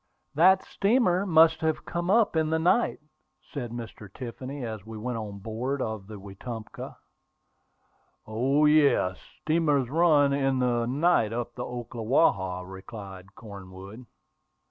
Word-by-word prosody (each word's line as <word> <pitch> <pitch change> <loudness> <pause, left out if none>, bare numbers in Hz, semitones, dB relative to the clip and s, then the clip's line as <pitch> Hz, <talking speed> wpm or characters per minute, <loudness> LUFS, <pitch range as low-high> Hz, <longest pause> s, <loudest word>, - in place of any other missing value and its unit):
"That 185 +5 +5
steamer 200 -3 +1
must 160 -1 +5
have 160 -1 -1
come 175 +1 -3
up 215 -2 +3
in 160 -1 +1
the 160 - +1
night," 180 +9 +2 0.5
said 125 -5 -4
Mr. 115 -4 -9
Tiffany, 130 +3 -7
as 110 -4 -6
we 110 +1 -9
went 120 +1 -4
on 105 -2 -7
board 115 +7 -3
of 110 -5 -4
the 105 -2 -9
Wetumpka. 110 +3 -8 1.3
"O, 130 +7 +1
yes; 145 -11 +3 0.2
steamers 150 -5 +1
run 150 -4 +4
in 135 -1 +1
the 120 -2 +1
night 135 -5 +2
up 120 0 -4
the 125 - -5
Ocklawaha," 115 - 0
replied 95 0 -10
Cornwood. 100 +2 -11
125 Hz, 130 wpm, -27 LUFS, 110-155 Hz, 1.3 s, That